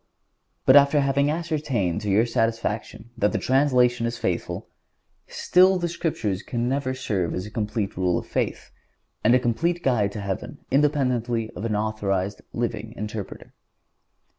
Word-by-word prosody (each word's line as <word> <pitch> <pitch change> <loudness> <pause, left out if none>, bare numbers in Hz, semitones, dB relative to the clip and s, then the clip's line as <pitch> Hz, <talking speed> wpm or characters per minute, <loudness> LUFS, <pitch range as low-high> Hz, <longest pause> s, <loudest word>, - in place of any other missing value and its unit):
But 130 - +7
after 145 +1 +6
having 140 +1 +2
ascertained 150 - -1
to 105 - -3
your 105 +4 +4
satisfaction 115 -1 -2
that 105 -3 +1
the - - +1
translation 125 -3 +2
is 115 0 -4
faithful, 95 -6 -3 0.6
still 185 +1 +4
the 175 -1 -1
Scriptures 130 - -2
can 120 0 -2
never 130 0 -1
serve 95 -9 -2
as 90 - -3
a 105 - -9
complete 105 -2 -2
Rule 90 -1 +1
of - - -4
Faith - - -3 0.5
and 120 - +5
a - - +5
complete 165 +9 0
guide 110 -6 +2
to 105 - -5
heaven 100 -1 -4
independently 125 -6 +1
of 110 - -6
an 110 -2 0
authorized, 105 -2 -1
living 115 -1 -3
interpreter. 105 -1 -6
115 Hz, 150 wpm, -24 LUFS, 105-135 Hz, 0.6 s, But